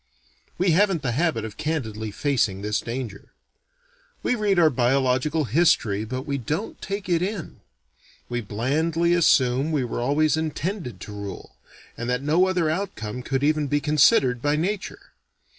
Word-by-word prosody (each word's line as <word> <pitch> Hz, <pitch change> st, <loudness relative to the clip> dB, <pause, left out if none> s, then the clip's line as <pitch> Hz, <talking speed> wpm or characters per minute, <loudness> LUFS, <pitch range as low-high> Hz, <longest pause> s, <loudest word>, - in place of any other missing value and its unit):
We 185 Hz, 0 st, +2 dB
haven't 185 Hz, -2 st, +2 dB
the 125 Hz, -, 0 dB
habit 135 Hz, -4 st, 0 dB
of 110 Hz, -, -8 dB
candidly 110 Hz, -9 st, -3 dB
facing 105 Hz, -5 st, 0 dB
this 105 Hz, +1 st, 0 dB
danger. 115 Hz, -4 st, -6 dB, 0.9 s
We -, -, +1 dB
read 210 Hz, -5 st, +1 dB
our 160 Hz, -3 st, +5 dB
biological 130 Hz, +4 st, +1 dB
history 120 Hz, -, +2 dB
but 130 Hz, +3 st, -4 dB
we 140 Hz, -1 st, -3 dB
don't 155 Hz, -, -4 dB
take 200 Hz, -1 st, -4 dB
it 170 Hz, -2 st, +2 dB
in. 190 Hz, -2 st, -4 dB, 0.7 s
We 120 Hz, 0 st, -2 dB
blandly 155 Hz, +11 st, 0 dB
assume 135 Hz, -4 st, +3 dB
we 145 Hz, -4 st, +1 dB
were 120 Hz, 0 st, -3 dB
always 150 Hz, +5 st, +2 dB
"intended" 160 Hz, -, -3 dB
to 105 Hz, -, -8 dB
rule, 100 Hz, -1 st, -8 dB, 0.4 s
and 120 Hz, +1 st, -4 dB
that 125 Hz, +2 st, -1 dB
no 165 Hz, +6 st, +3 dB
other 180 Hz, -3 st, +1 dB
outcome 155 Hz, -, -3 dB
could 135 Hz, +2 st, -2 dB
even 150 Hz, 0 st, +2 dB
be 145 Hz, +2 st, +1 dB
considered 140 Hz, -, +3 dB
by 145 Hz, +2 st, +1 dB
Nature. 190 Hz, +6 st, -3 dB
145 Hz, 155 wpm, -24 LUFS, 120-165 Hz, 0.9 s, our